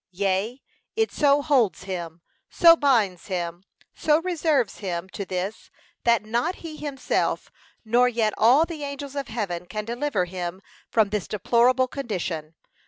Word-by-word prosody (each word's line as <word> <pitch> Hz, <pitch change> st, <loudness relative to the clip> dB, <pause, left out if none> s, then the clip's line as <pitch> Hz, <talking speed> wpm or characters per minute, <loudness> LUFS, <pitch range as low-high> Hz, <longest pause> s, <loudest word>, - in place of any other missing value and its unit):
Yea, 195 Hz, +6 st, -1 dB, 0.4 s
it 445 Hz, 0 st, +1 dB
so 285 Hz, -1 st, +3 dB
holds 240 Hz, -, +2 dB
him, 175 Hz, -3 st, -6 dB, 0.3 s
so 335 Hz, -1 st, +7 dB
binds 225 Hz, -, +1 dB
him, 175 Hz, -2 st, -3 dB, 0.3 s
so 305 Hz, 0 st, +2 dB
reserves 315 Hz, -, 0 dB
him 180 Hz, -3 st, -3 dB
to 200 Hz, -, -6 dB
this, 190 Hz, +4 st, -4 dB, 0.4 s
that 235 Hz, -3 st, +3 dB
not 240 Hz, +12 st, 0 dB
he 315 Hz, -2 st, -6 dB
himself, 280 Hz, -4 st, -2 dB, 0.3 s
nor 245 Hz, +3 st, +4 dB
yet 225 Hz, -3 st, 0 dB
all 255 Hz, +9 st, +5 dB
the 325 Hz, -3 st, -7 dB
angels 280 Hz, 0 st, -6 dB
of 280 Hz, -1 st, -3 dB
heaven, 185 Hz, -6 st, -4 dB
can 215 Hz, +2 st, -4 dB
deliver 240 Hz, -3 st, -1 dB
him 180 Hz, 0 st, -5 dB, 0.3 s
from 220 Hz, -3 st, +3 dB
this 210 Hz, -4 st, -2 dB
deplorable 240 Hz, +5 st, +3 dB
condition. 180 Hz, -, -4 dB
225 Hz, 145 wpm, -25 LUFS, 185-280 Hz, 0.4 s, so